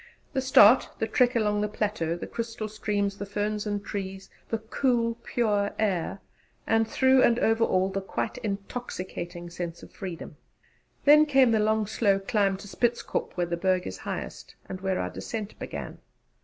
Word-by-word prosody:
The 265 - +1
start, 260 -3 +6
the - - 0
trek 245 +3 +2
along 210 -2 +1
the 210 - +1
plateau, 205 -6 -1
the - - -6
crystal 230 -2 -4
streams, 205 -2 -2
the 200 - -3
ferns 210 +1 -2
and 205 -1 -3
trees, 195 -1 -5 0.2
the 225 - 0
cool 230 +1 0
pure 205 -4 0
air; 195 -2 -1 0.4
and, 225 0 +2
through 260 +2 +4
and 235 -1 +4
over 225 -1 +2
all, 185 -3 +2
the 195 - -2
quite 215 +5 -3
intoxicating 195 -5 -5
sense 170 -1 -6
of - - -12
freedom! 175 -6 -7 0.7
Then 300 +1 +7
came 270 -4 +5
the 220 - +3
long 215 0 +2
slow 205 -1 +2
climb 195 -1 +1
to 205 - -11
Spitzkop 240 +4 -1
where 175 - +1
the 170 0 -3
Berg 185 0 +1
is 95 - -6
highest - - -6
and 185 -1 -6
where 190 -1 0
our - - -2
descent 215 -3 -6
began. - - -6
210 Hz, 170 wpm, -27 LUFS, 195-230 Hz, 0.7 s, Then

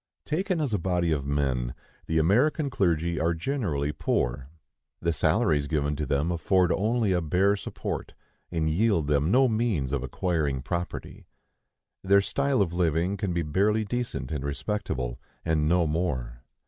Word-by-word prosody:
Taken 180 +2 -1
as 145 -7 -1
a 105 - +1
body 90 -1 0
of 70 -3 -1
men, 65 -4 0 0.3
the 80 - 0
American 130 - +2
clergy 85 -5 +1
are 85 +2 +1
generally 80 - -1
poor. 65 -3 -1 0.5
The 85 0 0
salaries 75 -1 +2
given 75 -1 0
to 75 -2 -2
them 70 +5 +1
afford 90 +2 +2
only 110 +2 +1
a 90 -1 +2
bare 95 +6 +2
support, 100 - -5 0.4
and 80 -2 0
yield 90 0 +2
them 75 +1 +2
no 130 +5 +5
means 110 - 0
of 70 - 0
acquiring 70 -1 -1
property. 85 +3 -5 0.8
Their 100 +1 +5
style 140 +1 +1
of 85 -3 -4
living 85 +2 +1
can 100 -2 -2
be 85 -1 0
barely 105 +8 +1
decent 120 -3 -3
and 75 -4 -3
respectable, 70 - -3 0.3
and 80 -2 +1
no 85 0 +3
more. 70 -7 -2
85 Hz, 155 wpm, -27 LUFS, 75-100 Hz, 0.8 s, no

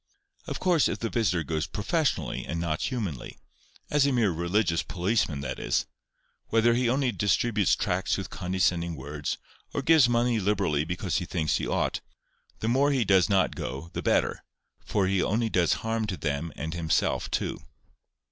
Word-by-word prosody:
Of - - -4
course, 175 -5 +3
if - - -2
the 115 - -3
visitor 90 -8 +1
goes 80 0 -2
professionally 150 - -1
and 85 - -4
not 80 -2 -2
humanly,—as 120 - -3
a - - +2
mere 115 -6 +2
religious 85 +1 +1
policeman, 90 -5 -1
that 70 - -4
is—whether 65 - -1
he 120 0 +1
only 130 0 +1
distributes 105 +1 +2
tracts - - 0
with - - -6
condescending 90 -2 0
words, 75 +1 -4 0.4
or 140 - -1
gives 150 -4 +6
money 120 -1 +2
liberally 95 -7 +1
because 90 +2 -2
he 90 - -2
thinks 80 -4 0
he - - -3
ought, - - 0 0.6
the 110 - -1
more 135 +5 +3
he 135 -5 +1
does 95 -1 +4
not 95 -2 +2
go 70 +7 -5
the - - -3
better, - - +1 0.4
for 100 -3 0
he 95 0 +1
only 115 +4 +1
does 85 -3 +2
harm 115 -1 -1
to 95 -3 -3
them 75 +2 -2
and 80 +2 -4
himself 85 -3 0
too." - - -2
95 Hz, 165 wpm, -27 LUFS, 85-115 Hz, 0.6 s, gives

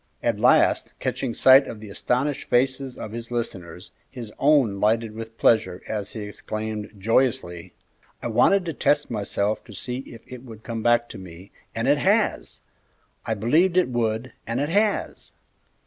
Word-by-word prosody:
At - - 0
last, - - +3
catching 130 - -2
sight 130 +4 +6
of 110 - -7
the 105 -2 -10
astonished 130 +7 -1
faces 130 +1 +1
of 105 - -7
his 115 +1 -7
listeners, 95 -7 -5 0.2
his 120 -5 -9
own 135 -9 +3
lighted 110 +1 +1
with 115 0 -9
pleasure, 95 -5 +2
as 105 -2 -4
he 110 - -6
exclaimed, 110 +1 -5
joyously, 115 -5 0 0.4
"I - - -4
wanted 180 - +3
to 165 - -3
test 145 -1 +1
myself 105 -1 -1
and - - -10
see 125 0 -4
if 115 - -11
it 125 -1 -10
would 110 -4 -12
come 115 -1 -4
back 120 +1 +3
to - - -9
me, 95 +1 -12 0.2
and - - -1
it - - +4
has! - - 0 0.7
I 110 - 0
believed 160 - +2
it 180 - +3
would, 115 0 -2
and 115 +2 -2
it 145 +2 -1
has!" 205 +4 -1
115 Hz, 165 wpm, -24 LUFS, 105-130 Hz, 0.7 s, sight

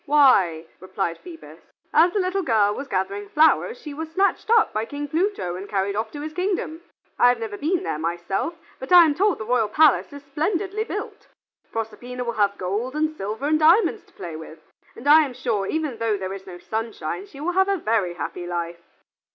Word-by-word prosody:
"Why," 205 - +4
replied 185 -2 -3
Phoebus, 335 -2 -12 0.3
"as 345 +2 +5
the 410 - 0
little 370 +1 0
girl 215 - +2
was 275 +6 -6
gathering 200 -1 -3
flowers 320 - +3
she 300 -10 -8
was 320 +2 -6
snatched 390 +4 0
up 460 -1 +4
by 215 - -1
King 290 +5 -5
Pluto 325 - -1
and 190 +2 -8
carried 200 0 -1
off 220 +1 -2
to 290 - -6
his 310 +1 -6
kingdom. 360 -3 -2 0.4
I 245 - +7
have 245 - +2
never 220 -2 -5
been 335 - -1
there 150 - -3
myself, 175 - -2 0.2
but 260 - -8
I 350 -1 +9
am 305 - +2
told 390 +4 +2
the 220 - -6
royal 240 -2 +2
palace 300 +4 +4
is 285 0 -10
splendidly 380 +9 -2
built. - - -6 0.4
Proserpina 245 +3 -5
will 235 -1 -3
have 200 -2 +1
gold 210 +9 -3
and 310 0 0
silver 215 +3 -4
and 310 +1 +2
diamonds 380 +7 +4
to - - -27
play 170 -4 -7
with, 160 0 -10 0.4
and 245 - -8
I 305 +2 +8
am 265 -4 -5
sure 210 -6 -1
even 315 -2 -1
although 230 -3 -1
there 190 0 -4
is 195 -1 -9
no 180 -1 -8
sunshine, 225 - -4
she 280 -8 -13
will 325 +5 -1
have 380 +2 +2
a 395 - +2
very 215 - 0
happy 175 +3 -5
life." 170 -1 -4
250 Hz, 210 wpm, -23 LUFS, 200-320 Hz, 0.4 s, I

